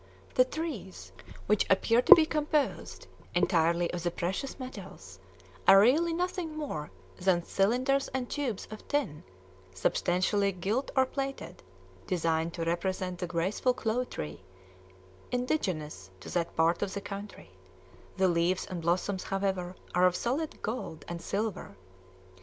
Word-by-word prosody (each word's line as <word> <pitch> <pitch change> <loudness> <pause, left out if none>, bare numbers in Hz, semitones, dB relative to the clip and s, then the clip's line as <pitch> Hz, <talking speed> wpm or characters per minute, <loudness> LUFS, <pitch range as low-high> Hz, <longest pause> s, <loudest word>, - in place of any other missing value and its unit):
The 255 - +5
trees, 270 - -6 0.3
which 210 0 +2
appear 230 +5 +4
to - - +11
be 320 - +4
composed 300 -2 -1 0.3
entirely 170 0 +2
of 175 - -3
the 175 - 0
precious 185 +10 -3
metals, 190 - -9 0.5
are 195 0 +10
really 295 +11 +4
nothing 345 -2 -2
more 155 - -4 0.3
than 180 -2 +2
cylinders 250 +10 +1
and 255 -1 -3
tubes 255 -9 -3
of 215 - -9
tin, 275 - -1 0.5
substantially 185 - +1
gilt 205 +9 -1
or 265 -1 +5
plated, 275 +1 -5 0.5
designed 165 -1 0
to 170 - -2
represent 180 +1 -2
the 180 - -2
graceful 185 +9 0
clove 245 +3 -1
tree 75 +2 -6 0.9
indigenous 180 - -2
to - - -9
that 170 -1 -1
part 165 +1 +2
of 200 -1 -2
the 200 - -3
country; 200 - -8 0.7
the 190 0 +4
leaves 175 +1 +1
and 180 -2 -5
blossoms, 185 +3 0
however, 190 -2 -2 0.2
are 180 +1 +5
of 180 - 0
solid 280 - -2
gold 215 -8 -4
and 170 0 -5
silver. 200 - -3
195 Hz, 135 wpm, -30 LUFS, 175-255 Hz, 0.9 s, to